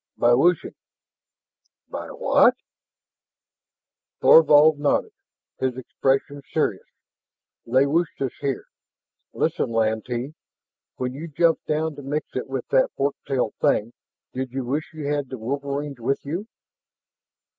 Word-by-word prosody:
"By 120 0 +4
wishing." 165 +7 +2 1.1
"By - - -6
what?" - - +3 1.6
Thorvald 155 -1 +7
nodded, 145 - +1 0.5
his 130 -1 -1
expression 135 +2 -1
serious. - - -1 0.8
"They 130 +4 +4
wished 165 +4 0
us 135 -3 -1
here. 140 -3 -2 0.7
Listen, - - -1
Lantee, 115 +4 -1 0.6
when 125 0 -3
you 155 +5 -7
jumped 165 +2 +1
down 155 +1 0
to - - -7
mix 145 +3 -2
it 130 - -3
with 135 -2 -4
that 130 - +3
fork 140 +1 +1
tailed 125 -5 0
thing, 115 +3 +2 0.4
did 130 -1 -4
you 130 0 -3
wish 145 +5 -2
you 155 -2 -7
had 145 -2 -1
the 130 - -6
wolverines 140 +3 -4
with 135 +5 -1
you?" 175 +9 -4
140 Hz, 125 wpm, -24 LUFS, 130-150 Hz, 1.6 s, Thorvald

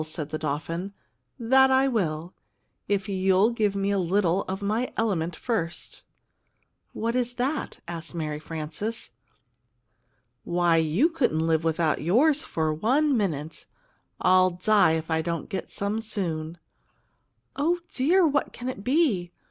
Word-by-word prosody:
said 155 -1 -5
the 155 - -3
dolphin. 165 +6 -3 0.4
"That 265 +3 +5
I 265 +1 +4
will, 175 -8 -1 0.5
if 200 -1 0
you'll 190 +2 +3
get 210 -4 0
me 200 0 0
a 200 - +1
little 185 0 +1
of 190 +1 -4
my 220 +5 -1
element 175 -7 0
first." 175 -5 -3 0.9
"What 230 +2 -2
is 245 -1 -1
that?" 270 +5 -2
asked 170 0 -6
Mary 150 -2 -3
Frances. 160 - -5 1.3
"Why, 175 -1 +2
you 165 - +3
couldn't 245 - 0
live 160 -1 +1
without 160 -1 +1
yours 275 - +3
for 155 -1 -1
one 265 - +2
minute! 160 - -2 0.5
I'll 185 0 +5
die 185 0 +3
if 160 0 -3
I 160 0 +2
don't 170 -1 -4
get 190 - -4
some 205 +2 -2
soon!" 170 -7 -3 1.0
"Oh, 325 +5 +1 0.2
dear, 340 +8 +3
what 290 -2 +1
can 245 +1 -5
it 200 -6 -6
be? 250 - +1
190 Hz, 140 wpm, -26 LUFS, 165-235 Hz, 1.3 s, That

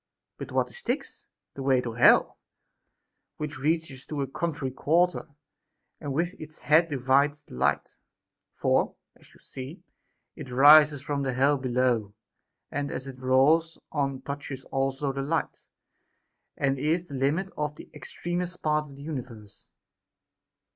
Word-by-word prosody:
But - - -7
what - - 0
is - - -6
Styx 485 - -1
X - - -16 0.3
The 140 - -7
way 135 -1 +3
to 120 -2 -4
hell, 115 - +5 1.0
which 150 -2 -5
reaches 150 -2 -1
to 150 -2 -3
the 135 - -16
contrary 150 -5 -3
quarter, 170 +7 +1 0.7
and 145 - -5
with 170 +6 -1
its 155 0 -9
head 160 +3 +4
divides 140 +2 +2
the - - -16
light; 65 - 0 0.6
for, - - +1 0.2
as - - -20
you - - -20
see, 140 +8 -9 0.5
it 150 -5 -9
rises 145 +2 +7
from 145 -1 -2
hell 135 +3 +2
below, 125 -5 0 0.6
and 145 0 -2
as 130 - -5
it 135 -1 -9
rolls 145 +6 +3
on 135 -3 -2
touches 140 -2 -6
also 135 +1 -1
the 135 - -3
light, 160 +4 -3 0.9
and 135 -1 0
is 165 +5 0
the 140 - -10
limit 150 +8 0
of 150 0 -3
the - - -12
extremest 175 +1 -5
part 150 0 +1
of 140 - -13
the 140 - -11
universe. 120 -9 -8
140 Hz, 145 wpm, -27 LUFS, 130-155 Hz, 1.0 s, rises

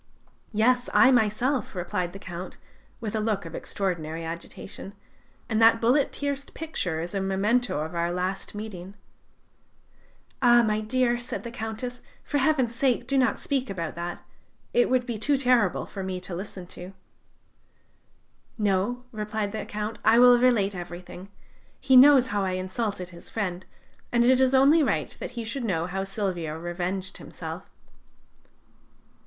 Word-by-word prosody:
"Yes, 245 +3 +2
I 265 - +7
myself," 240 +1 +1
replied 180 0 -2
the 195 - -9
Count, 185 -1 -8 0.4
with 225 -3 -4
a - - +1
look 210 -4 -1
of 165 - -8
extraordinary 165 -5 -3
agitation; 170 +4 -7 0.5
"and 220 -1 0
that 225 0 +6
bullet 250 +5 +3
pierced 280 -1 -4
picture 180 - -3
is 175 +3 -6
a 195 - -1
memento 195 +1 +1
of 160 +2 -5
our 170 0 0
last 185 +3 -3
meeting." 200 -3 -7 1.5
"Ah, 240 0 +6
my 215 -1 +1
dear," 240 +2 +1
said 245 - -5
the 235 - -6
Countess, 240 +2 -5 0.2
"for 290 - -1
Heaven's 265 -4 +2
sake, 245 0 +1
do 275 - -1
not 260 -2 +3
speak 270 -2 -1
about 170 -4 -4
that; 175 +1 -6 0.5
it 245 - +3
would 255 -1 +2
be 235 -4 -4
too 280 +6 +3
terrible 250 -7 +2
for 195 - -7
me 185 -1 -3
to 180 0 -6
listen 185 0 -7
to." 180 +2 -9 1.6
"No," 210 +4 0
replied 215 -2 -3
the 215 -1 -5
Count: 210 +1 -4
"I 220 +2 +5
will 245 0 +7
relate 230 -6 +3
everything. 180 +1 -8 0.5
He 265 -1 +3
knows 260 -1 +8
how 205 -1 0
I 185 -1 -1
insulted 185 0 -3
his 170 -1 -12
friend, 185 -4 -3 0.4
and 240 0 +3
it 260 +1 +5
is 260 0 +4
only 280 +5 +6
right 285 - 0
that - - -7
he 235 - -2
should 235 +4 -4
know 175 -7 0
how 190 +2 -3
Silvio 185 -6 -3
revenged 175 +3 -4
himself." - - -8
210 Hz, 155 wpm, -26 LUFS, 185-245 Hz, 1.6 s, knows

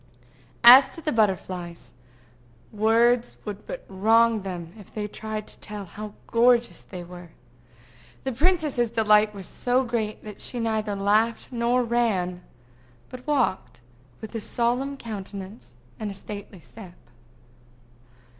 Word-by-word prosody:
As 255 +3 +10
to 330 - -9
the 305 - -1
butterflies, 185 -5 -1 0.8
words 230 +3 +2
would 210 -1 -7
but - - -7
wrong 225 +3 +3
them 175 -3 -6
if 205 - -14
they 210 -1 -4
tried 215 0 -5
to - - -11
tell 210 -1 -6
how 210 +4 -9
gorgeous 240 0 +3
they 180 -1 -9
were. 175 0 -11 0.9
The 265 - -2
princess's 295 -4 +1
delight 215 -2 +3
was 195 -2 -7
so 250 +6 0
great 230 -3 -3
that 210 -1 -9
she 245 - -3
neither 220 -2 -1
laughed 210 +4 +1
nor 245 +1 +1
ran, 210 -7 0 0.7
but 255 +1 -10
walked 265 -10 0
about 120 +1 -30
with 220 - -8
a 225 - -2
solemn 250 +5 0
countenance 200 - -8 0.2
and 205 -2 -4
stately 200 -2 -9
step. 185 -4 -13
215 Hz, 130 wpm, -25 LUFS, 195-235 Hz, 0.9 s, As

